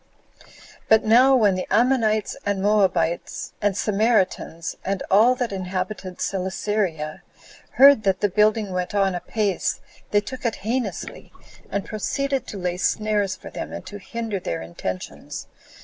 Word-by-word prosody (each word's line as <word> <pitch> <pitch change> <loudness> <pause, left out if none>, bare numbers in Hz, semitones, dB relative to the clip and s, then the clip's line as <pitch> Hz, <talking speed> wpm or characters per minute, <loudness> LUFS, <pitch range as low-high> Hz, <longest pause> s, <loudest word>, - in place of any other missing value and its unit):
8. - - -23 0.4
But 220 0 +5
now 250 +5 +6
when 210 -6 +4
the 185 0 -3
Ammonites, 220 -2 +2
and 200 -1 -1
Moabites, 190 -5 +1
and 205 -1 +1
Samaritans, 200 -6 0
and 195 0 -2
all 225 +6 +6
that 245 -3 -2
inhabited 185 0 -4
Celesyria, 185 -4 -2 0.5
heard 275 -3 +7
that 195 -2 +1
the 205 - +2
building 210 +1 +2
went 180 +2 -3
on 195 -2 +2
apace, 195 +2 -1 0.3
they 205 - +3
took 260 +5 -8
it 235 -3 0
heinously, 230 -5 -3 0.4
and 200 -1 -2
proceeded 275 +5 -2
to 205 - -6
lay 180 -1 -2
snares 210 0 0
for - - -11
them, - - -6
and - - -7
to 205 +2 -8
hinder 225 0 -4
their 85 - -4
intentions. 90 +2 -6
205 Hz, 145 wpm, -23 LUFS, 185-220 Hz, 0.5 s, heard